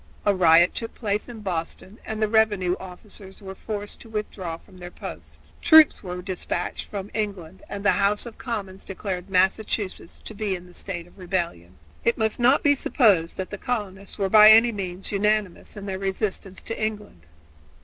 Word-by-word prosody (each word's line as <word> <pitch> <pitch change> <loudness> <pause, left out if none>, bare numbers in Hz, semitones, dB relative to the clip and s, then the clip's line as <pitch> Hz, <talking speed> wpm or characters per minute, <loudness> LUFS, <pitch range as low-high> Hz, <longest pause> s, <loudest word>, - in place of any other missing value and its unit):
A 205 - +4
riot 175 -1 +5
took 230 - -5
place 210 0 -2
at 225 -3 -9
Boston, 185 +3 -5
and 220 0 -5
the 215 - +2
revenue 205 -5 +2
officers 190 +1 -12
were 190 -2 -8
forced 205 +1 -6
to 230 - -14
withdraw 195 -6 -4
from 185 +2 -18
their 175 0 -8
posts. 75 - -11
Troops 315 -1 +7
were 180 -2 -6
dispatched 180 -1 -4
from 200 -1 -6
England 195 -5 -4
and 200 0 -6
the 205 - +6
House 205 +2 +1
of 235 - -10
Commons 200 -6 -5
declared 190 -1 -5
Massachusetts 190 0 0
to - - -7
be 205 -2 -2
in 180 0 -9
a 180 - -16
state 175 -3 -6
of 175 - -20
rebellion. 170 - -3 0.3
It 235 - +2
must 220 -1 0
not 250 +4 +4
be 290 - +5
supposed 205 - +2
that 190 - -5
the 205 - -6
colonists 200 -5 -4
were 195 -2 0
by 215 +2 +8
any 225 +2 +7
means 190 -3 -5
unanimous 210 -1 -1
in 200 - -7
their 190 -1 -4
resistance 195 -1 -3
to 225 - -4
England. 210 - -5
195 Hz, 180 wpm, -24 LUFS, 180-215 Hz, 0.3 s, by